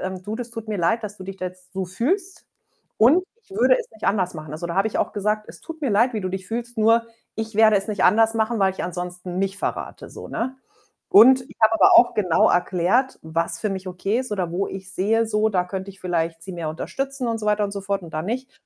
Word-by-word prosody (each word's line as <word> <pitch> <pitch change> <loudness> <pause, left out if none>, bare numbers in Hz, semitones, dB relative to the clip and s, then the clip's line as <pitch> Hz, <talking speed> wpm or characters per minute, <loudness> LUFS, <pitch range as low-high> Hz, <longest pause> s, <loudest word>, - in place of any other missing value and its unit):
ähm: 185 -1 -5
„Du, 210 +4 -5
das 245 0 -6
tut 225 -2 -8
mir 210 -3 -2
leid, 225 +8 +1
dass 210 -1 -6
du 190 - -10
dich 195 0 -7
da 185 -1 -4
jetzt 180 0 -11
so 190 0 -2
fühlst 350 - -2 0.5
und 295 +12 +5 0.2
ich - - -30
würde 445 +5 +4
es 475 - -7
nicht 220 - -10
anders 185 -3 +1
machen.“ 155 -2 -8
Also, 155 +3 -5
da 170 - -4
habe 195 +2 +3
ich - - -5
auch - - 0
gesagt: 210 +1 -1
„Es - - -11
tut 320 -1 -9
mir 270 - 0
leid, 235 +5 +3
wie 215 - -1
du 185 - -3
dich 190 0 -5
fühlst, 235 0 -4
nur 225 +2 +4 0.3
ich 220 -1 -5
werde 215 -1 +6
es 195 +1 -2
nicht 210 -3 0
anders 225 +1 +4
machen, 225 +1 0
weil 190 -1 +3
ich - - -5
ansonsten 180 0 -5
mich 195 0 -1
verrate“, - - -4
so, - - -9
ne? 260 +3 -3 0.5
Und 255 +5 +7
ich 255 - -16
habe 220 +1 +5
aber - - +6
auch 240 - +6
genau 180 -6 +3
erklärt, 185 +9 +1
was 165 +1 -1
für 215 - -1
mich 190 -1 -5
okay 195 +5 -1
ist 255 -4 -4
oder 185 -4 -2
wo 190 +3 -1
ich 190 0 -7
sehe 225 +4 +1
so, 215 0 +1
da 185 -4 0
könnte 190 +1 -6
ich 195 - -16
vielleicht 165 -2 -2
sie 190 - -7
mehr 170 -2 -4
unterstützen 270 - -3
und 230 -1 -1
so 215 - -5
weiter 210 0 +2
und 200 - -3
so 200 - -4
fort 195 -1 -2
und 165 - -11
da 155 - -1
nicht 255 +8 -4
205 Hz, 260 wpm, -23 LUFS, 185-230 Hz, 0.5 s, Und